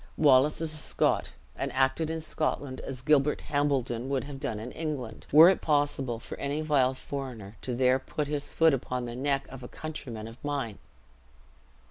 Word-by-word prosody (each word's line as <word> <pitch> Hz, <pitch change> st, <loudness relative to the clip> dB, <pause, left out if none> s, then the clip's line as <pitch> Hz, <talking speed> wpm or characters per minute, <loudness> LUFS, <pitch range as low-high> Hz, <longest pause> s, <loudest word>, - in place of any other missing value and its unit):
Wallace 145 Hz, +1 st, +5 dB
is 160 Hz, -1 st, -2 dB
a -, -, -4 dB
Scot, -, -, 0 dB, 0.2 s
and -, -, -3 dB
acted 135 Hz, +4 st, +2 dB
in 160 Hz, 0 st, -3 dB
Scotland 145 Hz, -4 st, -2 dB
as 130 Hz, -1 st, -6 dB
Gilbert 150 Hz, 0 st, +3 dB
Hambledon 135 Hz, -4 st, 0 dB
would 135 Hz, -2 st, 0 dB
have 140 Hz, -1 st, -8 dB
done 110 Hz, -5 st, -3 dB
in 120 Hz, +3 st, -6 dB
England, 140 Hz, -9 st, -5 dB
were 155 Hz, +4 st, +10 dB
it 190 Hz, -, +4 dB
possible 145 Hz, -5 st, +1 dB
for -, -, -7 dB
any 145 Hz, +2 st, -1 dB
vile 135 Hz, -4 st, +2 dB
foreigner 125 Hz, -7 st, -6 dB
to 125 Hz, -, -3 dB
there 130 Hz, +1 st, +3 dB
put 150 Hz, +3 st, -3 dB
his 145 Hz, -1 st, -2 dB
foot 160 Hz, -2 st, +4 dB
upon 125 Hz, -1 st, -2 dB
the 120 Hz, 0 st, -6 dB
neck 135 Hz, +1 st, 0 dB
of 135 Hz, -1 st, -9 dB
a 125 Hz, -, -7 dB
countryman 125 Hz, -9 st, -7 dB
of 115 Hz, +2 st, -13 dB
mine. 140 Hz, -8 st, -3 dB
135 Hz, 180 wpm, -29 LUFS, 125-150 Hz, 0.2 s, were